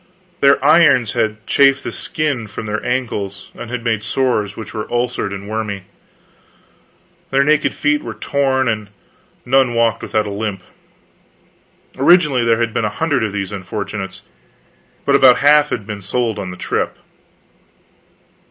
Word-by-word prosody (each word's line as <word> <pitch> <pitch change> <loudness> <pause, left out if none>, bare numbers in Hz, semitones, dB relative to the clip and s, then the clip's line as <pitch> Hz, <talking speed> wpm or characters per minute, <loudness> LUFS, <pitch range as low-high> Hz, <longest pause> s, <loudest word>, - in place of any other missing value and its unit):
Their 140 0 +5
irons 145 -8 +5
had 110 -2 -2
chafed 140 0 +3
the - - -4
skin 145 -8 -2
from 110 +2 -7
their 110 0 -3
ankles 105 -6 -3
and 120 0 -6
made 110 -3 -1
sores 110 -5 -1
which 110 - -8
were 110 -1 -5
ulcerated 120 -5 -2
and 100 - -11
wormy. 105 -3 -4 1.5
Their 135 +1 +3
naked 150 +1 +2
feet 150 0 +1
were - - -7
torn, 135 -2 0
and 110 -2 -2 0.6
none 130 -1 +3
walked 115 -1 +1
without 110 -1 -1
a 100 - -5
limp. 100 -2 -4 1.3
Originally 150 -9 +4
there 115 -1 +2
had 115 -1 -1
been - - 0
a 105 - +1
hundred 145 +3 -1
of 110 - -1
these 95 -1 -4
unfortunates, 100 0 -6 0.8
but 140 - +2
about 130 -3 +6
half 150 +1 +5
had 105 - -3
been 105 -1 -6
sold 115 +3 -2
on 95 - -5
the 90 - -8
trip. - - -2
115 Hz, 150 wpm, -18 LUFS, 105-135 Hz, 1.5 s, about